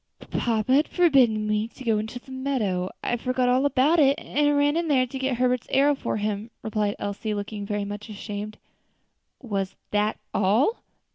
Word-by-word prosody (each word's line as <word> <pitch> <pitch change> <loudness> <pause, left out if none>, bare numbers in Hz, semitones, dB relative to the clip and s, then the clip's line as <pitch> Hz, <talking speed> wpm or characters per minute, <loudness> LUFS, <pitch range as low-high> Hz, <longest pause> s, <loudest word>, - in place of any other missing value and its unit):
"Papa 230 +1 +1
had 290 +3 +4
forbidden 260 -11 +3
me 215 +1 0
to 260 - -13
go 225 -3 +2
into 220 +3 -5
the 255 +2 -13
meadow, 235 -9 -1
I 240 - 0
forgot 255 +1 0
all 260 +3 +3
about 285 +5 +3
it, 275 -2 +5
and 290 0 +1
ran 290 +1 +3
in 335 0 0
there 265 -4 +3
to 265 +2 -7
get 265 -2 -1
Herbert's 250 -1 +1
arrow 285 +2 +4
for 270 - -3
him," 210 +1 -3
replied 210 -1 -1
Elsie, 205 +1 -3
looking 205 0 -5
very 205 -1 -2
much 205 +1 -7
ashamed. 210 0 -6 0.9
"Was 195 -5 -3 0.2
_that 210 +1 +2 0.2
all? 220 - +2
230 Hz, 180 wpm, -25 LUFS, 210-270 Hz, 0.9 s, it